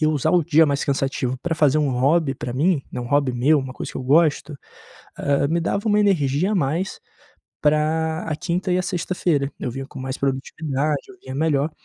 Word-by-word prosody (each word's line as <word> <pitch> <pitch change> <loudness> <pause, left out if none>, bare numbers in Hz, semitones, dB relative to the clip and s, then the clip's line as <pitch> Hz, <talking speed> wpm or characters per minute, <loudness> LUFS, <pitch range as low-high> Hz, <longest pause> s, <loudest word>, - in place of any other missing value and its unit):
E - - +2
eu 155 - +3
usar 150 +2 +1
o 175 -3 +3
dia 160 0 +5
mais 140 0 0
cansativo 135 -2 -1
pra 165 +5 -2
fazer 150 -1 +3
um 145 -3 +1
hobby 135 +3 +2
pra 120 - -5
mim, 150 +3 +1
né, - - -4
um 120 - -5
hobby 140 -1 +1
meu, 135 +6 +3
uma 135 -2 -4
coisa - - -6
que - - -7
eu - - -5
gosto, 150 +2 +2 0.6
ah, 140 0 +1
me 165 +3 +1
dava 200 +6 -1
uma 210 0 +3
energia 180 -2 +2
a - - +1
mais 170 +2 -1 0.6
pra 160 +2 +1
a 160 - -2
quinta 175 +2 -2
e 180 - +2
a - - 0
sexta-feira, 175 -6 -1
eu 125 - -2
vinha 135 +2 -6
com 140 - -11
mais 130 0 -4
produtividade, 140 +2 -2
eu 195 - -13
vinha 130 0 -7
melhor, 150 0 +1
150 Hz, 220 wpm, -22 LUFS, 135-165 Hz, 0.6 s, dia